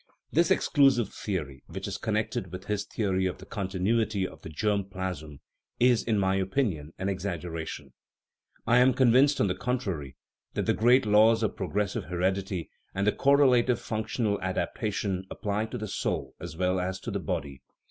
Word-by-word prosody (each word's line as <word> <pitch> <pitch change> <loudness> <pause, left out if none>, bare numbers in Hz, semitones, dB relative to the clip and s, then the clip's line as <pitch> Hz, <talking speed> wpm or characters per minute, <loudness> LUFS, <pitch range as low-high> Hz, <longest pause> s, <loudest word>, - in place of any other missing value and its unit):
This 170 +2 +3
exclusive 135 -7 +3
theory, 75 - -4
which - - -6
is - - -4
connected 105 -4 -2
with 90 +1 -7
his 105 0 -2
theory 95 -4 0
of 90 - -4
the 95 - -12
continuity 100 +1 0
of - - -14
the - - -8
germ 100 +6 0
plasm, 90 -6 -6 0.4
is, 125 -1 +4
in 110 -2 0
my 95 -1 +2
opinion, 95 - -1
an 95 - -3
exaggeration. 85 -7 -4 0.7
I 120 +1 +5
am 125 0 +5
convinced, 130 +3 +5
on - - +4
the 90 - +1
contrary, 95 - -3 0.4
that - - 0
the - - +3
great 125 +3 +4
laws 110 +2 +5
of 110 - 0
progressive 100 +1 -2
heredity 95 +1 -2 0.2
and 100 +2 0
of 105 - +4
the - - -18
correlative 130 -4 +4
functional 110 -1 -2
adaptation 95 0 -2
apply 105 +1 -2
to 125 - -5
the 110 -2 -4
soul - - -2
as 80 - -8
well 90 +1 +1
as 95 +1 -2
to 115 - -5
the 100 - -2
body. 70 -5 -4
100 Hz, 170 wpm, -28 LUFS, 90-115 Hz, 0.7 s, I